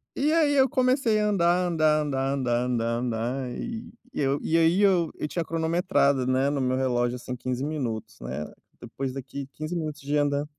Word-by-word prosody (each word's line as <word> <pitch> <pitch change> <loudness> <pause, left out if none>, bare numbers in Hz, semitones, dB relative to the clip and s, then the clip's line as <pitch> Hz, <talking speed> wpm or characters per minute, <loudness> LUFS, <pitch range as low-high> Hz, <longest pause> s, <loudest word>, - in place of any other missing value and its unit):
E 295 +3 +1
aí 310 -3 +3
eu 265 -1 +5
comecei 255 -4 +2
a 210 - +2
andar, 180 -2 +2
andar, 155 -2 +3
andar, 135 -2 -1
andar, 125 -3 0
andar, 115 -2 0
andar, 125 +2 -2
e 230 -1 -6 0.2
eu 140 0 0
e 165 - +1
aí 165 +3 +4
eu 185 -5 +3
eu 150 - -3
tinha 165 +3 -2
cronometrado, 160 -5 +1
né, 130 +2 +2
no 145 -1 -1
meu 130 0 +1
relógio, 125 -1 0
assim, 125 +1 -6
15 130 +2 -3
minutos, 115 -7 -4
né. 75 0 -5 0.3
Depois 135 -1 -4
daqui 135 +1 -6
15 155 +3 -5
minutos 155 -3 -3
de 145 +2 -2
andar 145 0 +1
145 Hz, 185 wpm, -26 LUFS, 130-175 Hz, 0.3 s, eu